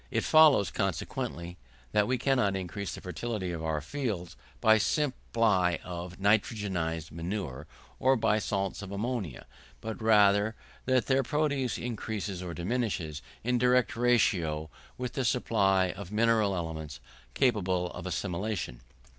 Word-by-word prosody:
It - - 0
follows, 150 - +6
consequently, 90 -2 -3 0.3
that 105 -1 +3
we 130 - +1
cannot 125 -8 +2
increase 95 +1 -4
the - - -10
fertility 95 0 -3
of 80 -2 -5
our 80 -1 -1
fields 100 - -4 0.2
by 110 - +6
a 110 - +4
supply 115 - +1
of 90 0 -6
nitrogenised 95 -6 0
manure, 85 -4 -4 0.3
or 130 +1 +4
by 110 -3 +2
salts 100 -2 -2
of 100 -1 -7
ammonia, 100 - -3 0.3
but 110 0 -6
rather 105 0 +4 0.3
that 130 -1 +2
their 135 0 +3
produce 140 -3 0
increases 105 -5 -4
or 90 -2 -5
diminishes, 90 -6 -2 0.2
in 125 +2 +1
a - - -1
direct 125 -1 +3
ratio, 90 -11 +2 0.3
with 125 -1 -4
the 135 - -1
supply 100 -6 +2
of 100 -2 -9
mineral 110 -2 +3
elements 80 -4 -5 0.4
capable 95 -7 +1
of 90 0 -7
assimilation. 90 - -3
100 Hz, 140 wpm, -29 LUFS, 90-120 Hz, 0.4 s, follows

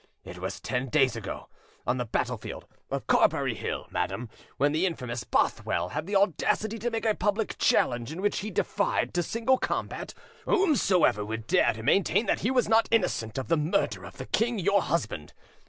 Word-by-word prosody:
It - - -9
was - - -4
ten 125 +1 -2
days 135 -4 +3
ago, 115 -4 -6 0.4
on 125 - +1
the 125 - -2
battlefield - - -3 0.2
of - - -3
Carberry - - +3
Hill, - - -4
madam, 115 -2 -2 0.3
when 145 +2 +3
the 160 +5 +2
infamous 125 -8 -4
Bothwell 90 -5 0
had 155 - -4
the 200 - -2
audacity 205 +3 +1
to 240 +4 -1
make 225 -1 -3
a 220 - +4
public 205 +2 -1
challenge 120 +2 +2
in 165 - -6
which 205 +2 0
he 210 - -4
defied 200 +1 0
to 175 - +1
single 230 +8 +1
combat - - -3 0.3
whomsoever 250 - +3
would 110 +1 -5
dare - - +3
to 110 +1 -8
maintain 195 - +3
that - - +1
he 225 - 0
was 255 -3 +2
not 225 +1 +4
innocent 180 - 0
of 130 - -3
the 165 - +2
murder 150 - 0
of 95 -1 -11
the 130 - -6
king 230 - 0
your 200 +1 +3
husband. 105 - -2
170 Hz, 190 wpm, -28 LUFS, -, 0.4 s, a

